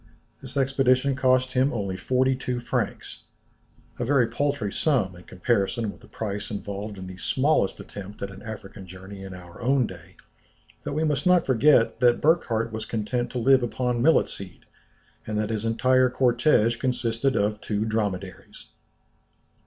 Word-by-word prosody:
This 130 +1 -7
expedition 135 0 +2
cost 130 -1 +2
him 130 +2 +2
only 100 -5 -3
forty 130 +7 +1
two 125 -1 -3
francs, 120 - -4 0.7
a - - 0
very 130 0 +3
paltry 120 -3 -2
sum 120 - +1
in 90 - -14
comparison 100 +3 -1
with - - -17
the - - -16
price 105 -1 -5
involved 100 0 -5
in 95 - -7
the 95 0 -9
smallest 130 0 +1
attempt 100 +1 -9
at 100 - -4
an 95 - -11
African 100 -3 -9
journey 95 +2 -10
in 95 -1 -8
our 90 +3 -12
own 130 +1 +2
day; 90 -2 -11 0.7
but - - -4
we 155 +2 0
must 150 0 0
not 180 -2 +5
forget 125 -2 +4
that 120 -1 +4
Burckhardt 115 -8 +1
was 110 0 -4
content 120 +2 -2
to - - -3
live 130 +2 +4
upon 120 0 -1
millet 160 +5 +4
seed, 95 -3 -8 0.6
and 105 0 -2
that 105 +1 -1
his 110 0 -2
entire 130 +3 +3
cortége 120 -2 +2
consisted 125 0 0
of 105 +1 0
two 105 0 -1
dromedaries. 105 -4 -4
115 Hz, 160 wpm, -25 LUFS, 100-130 Hz, 0.7 s, not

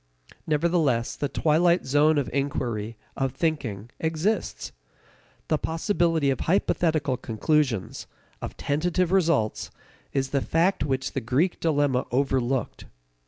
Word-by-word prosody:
Nevertheless 150 -6 +1
the 145 - -2
twilight 170 +5 +2
zone 145 +3 +3
of 140 -4 0
inquiry, 120 -6 -2 0.2
of 135 -2 -1
thinking, 125 - -2
exists. 165 +7 -1 0.8
The 155 - +1
possibility 165 -3 +1
of 130 - -2
hypothetical 160 -6 +1
conclusions, 115 -1 -1 0.3
of - - -6
tentative 175 +4 0
results, 165 - +1 0.4
is 135 -1 -1
the 140 - +1
fact 170 +7 +1
which 135 -2 -1
the - - -3
Greek 135 +10 0
dilemma 145 -5 +1
overlooked. 130 -1 -1
145 Hz, 115 wpm, -25 LUFS, 130-165 Hz, 0.8 s, zone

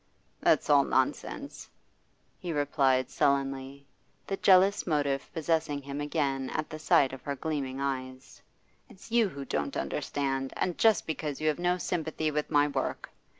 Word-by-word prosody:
'That's - - +3
all - - +6
nonsense,' - - -2 0.7
he 175 -3 -4
replied 135 -4 +2
sullenly, 135 0 0 0.4
the 195 - -2
jealous 195 +1 +4
motive 145 -4 0
possessing 160 -3 0
him 140 +1 -5
again 140 -3 -1
at 155 - -2
the 155 - -6
sight 135 -3 +3
of 135 - -8
her 140 - -3
gleaming 135 -2 -3
eyes. 130 -1 -5 0.5
'It's 195 +4 -15
you 230 -3 +3
who 140 -5 -7
don't 75 - -2
understand, 135 -1 -2
and 180 - -1
just 220 -4 +4
because 150 -3 -4
you 155 - -1
have 155 - -1
no 180 +1 +1
sympathy 160 -3 -2
with 150 0 -2
my 145 -1 +4
work. 145 - -3
145 Hz, 150 wpm, -29 LUFS, 135-160 Hz, 0.7 s, all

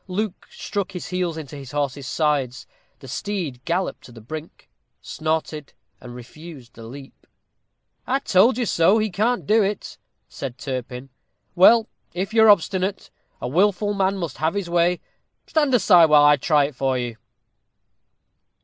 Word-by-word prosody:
Luke 195 +1 -4
struck 200 -2 -5
his 180 - -7
heels 180 -3 -2
into 150 -3 -8
his 135 -2 -10
horse's 140 -2 -3
sides. 140 -4 -1 0.4
The 135 - -11
steed 150 - -4
galloped 175 +3 -2
to - - -13
the 115 - -13
brink, 155 +8 -9 0.3
snorted, 155 -2 -4 0.3
and 120 -1 -11
refused 130 0 -12
the 115 -1 -11
leap. 135 +3 -13 0.8
"I 265 - +1
told 235 -2 +3
you 245 - 0
so 190 +2 +3
he 215 -2 -1
can't 225 +7 0
do 220 +2 +3
it," 200 0 -3 0.3
said 130 -2 -7
Turpin. 130 -1 -6 0.4
"Well, 225 +5 +6 0.3
if 190 +4 -3
you 225 - +4
are 220 - +7
obstinate, 190 0 +1 0.3
a - - -4
wilful 200 +7 +1
man 195 0 0
must 170 -7 -5
have 160 +4 -1
his 190 -4 -3
way. 175 +1 +2 0.4
Stand 295 -4 +1
aside, 180 -7 +6
while 150 -2 +5
I 145 0 +6
try 145 +1 +2
it 145 -1 -7
for 130 0 0
you." 120 -2 -4
165 Hz, 160 wpm, -22 LUFS, 135-195 Hz, 0.8 s, are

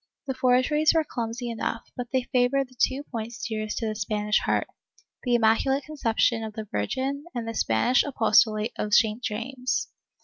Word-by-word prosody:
The 270 - -2
forgeries 260 +5 +3
were 320 - +4
clumsy 240 -3 -4
enough, 230 0 -4
but 245 -1 -4
they 260 -1 +1
favored 255 +1 +1
the 255 - -20
two 270 +2 +2
points 230 -1 -5
dearest 215 -1 -3
to 230 - -2
the 215 - -1
Spanish 210 0 0
heart - - 0 0.3
— - - -34
the 245 -2 +2
Immaculate 240 +5 +3
Conception 235 -6 0
of 220 -1 -6
the 215 0 -6
Virgin 265 - -2
and 235 -2 -3
the 230 - -3
Spanish 220 - +2
apostolate 220 -4 +3
of 210 0 +1
St. 220 0 +3
James. 250 +3 -2
240 Hz, 175 wpm, -26 LUFS, 220-260 Hz, 0.3 s, were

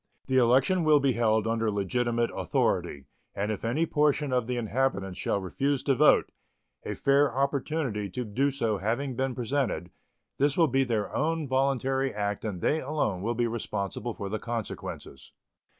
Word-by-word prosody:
The 130 - +1
election 130 +9 +3
will 155 -2 +5
be 140 -1 +2
held 110 -2 +2
under 115 0 0
legitimate 115 +4 0
authority, 70 -2 -1 0.3
and 105 +2 -1
if 105 - -5
any 130 +9 +1
portion 150 -3 +1
of 125 -3 +1
the 125 -1 -2
inhabitants 110 -5 -1
shall 100 - 0
refuse 135 +9 -1
to 140 - +2
vote, 150 +3 +4 0.5
a - - -4
fair 140 +1 +3
opportunity 135 -5 -1
to 120 +7 -4
do 130 +7 +1
so 115 -7 -1
having 120 +6 -2
been 130 0 -1
presented, 125 -7 -2 0.5
this 140 +1 +2
will 170 - +6
be 135 0 +2
their 115 -5 -2
own 160 0 0
voluntary 135 0 +1
act 105 -1 -3
and 100 -5 -4
they 155 - +2
alone 130 -10 -1
will 115 +4 -1
be 120 +1 +1
responsible 110 -1 -3
for 100 - -5
the 110 +2 -3
consequences. 115 - -6
125 Hz, 165 wpm, -28 LUFS, 110-140 Hz, 0.5 s, will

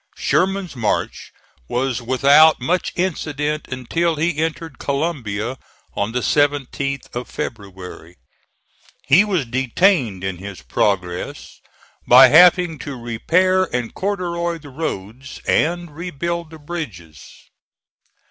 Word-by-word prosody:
Sherman's 190 -3 0
march 115 -4 -2 0.4
was 125 0 -1
without 140 +6 +5
much 175 +8 -1
incident 155 -4 -2
until 160 +7 -1
he 160 +1 -1
entered 160 -1 -3
Columbia, 130 -6 -2 0.4
on 100 +2 -1
the 125 +1 -1
17th 140 -1 -1
of 120 +1 -5
February. 95 -5 -7 0.9
He 155 +9 +5
was 185 -9 -1
detained 130 - +1
in 95 -2 -3
his 95 -7 -9
progress 90 +6 -2 0.5
by 130 +1 +9
having 175 0 +5
to 140 0 -6
repair 180 +11 +1
and 120 -7 -4
corduroy 175 -3 -2
the 150 -3 -13
roads, 130 -3 -6
and 175 -1 0
rebuild 170 0 -4
the 160 - -11
bridges. 115 - -7
140 Hz, 110 wpm, -20 LUFS, 120-170 Hz, 0.9 s, by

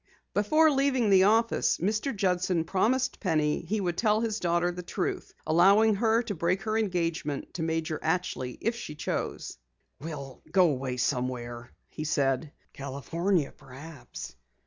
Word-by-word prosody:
Before 305 +10 +4
leaving 265 -6 +2
the 190 -1 +6
office, 225 +3 +3
Mr. 215 - 0
Judson 180 -3 +1
promised 250 +9 +1
Penny 155 -6 +1
he 205 +6 -2
would 175 -3 -2
tell 215 -2 +3
his 220 -2 -1
daughter 175 0 +1
the 180 0 -6
truth, 175 - -3
allowing 195 +7 +5
her 225 +3 +2
to 225 - -4
break 180 +2 0
her 220 0 -1
engagement 170 -8 -1
to 175 - -4
Major 160 -1 -1
Atchley 155 -6 -2
if 230 +1 0
she 150 -9 -7
chose. 150 - -4 0.4
"We'll 140 -4 -7
go 180 -2 +5
away 130 -2 -3
somewhere," 120 -2 -2 0.2
he 155 - -6
said. 140 -1 0 0.2
"California, 140 +5 -1
perhaps. 140 +2 -10
175 Hz, 145 wpm, -28 LUFS, 150-210 Hz, 0.4 s, the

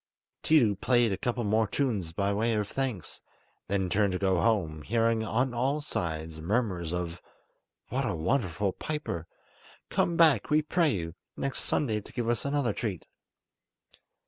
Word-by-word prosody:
Tiidu 120 -11 +4
played 120 -3 +3
a 95 - -1
couple 120 -1 -1
more 110 +1 +2
tunes 105 - -1
by 100 +4 0
way 115 +2 +1
of 105 -1 0
thanks, 125 -8 -4 0.5
then 95 -1 0
turned 100 +1 +2
to - - 0
go 95 -3 +2
home, 85 -10 +1
hearing 115 +4 +1
on 125 +4 0
all 130 +5 +1
sides 80 - -4
murmurs 90 -3 0
of 90 -1 -3 0.7
"What - - 0
a - - -1
wonderful 95 - 0
piper! 110 - -4 0.6
Come 170 -1 +1
back, 155 -10 +5
we 155 0 +3
pray 165 +1 +2
you, 85 - -2 0.2
next 135 -1 -2
Sunday 110 -7 0
to - - -15
give 120 -2 -2
us 120 +1 0
another 140 -5 +1
treat." 100 -7 -4
110 Hz, 155 wpm, -29 LUFS, 90-125 Hz, 0.7 s, back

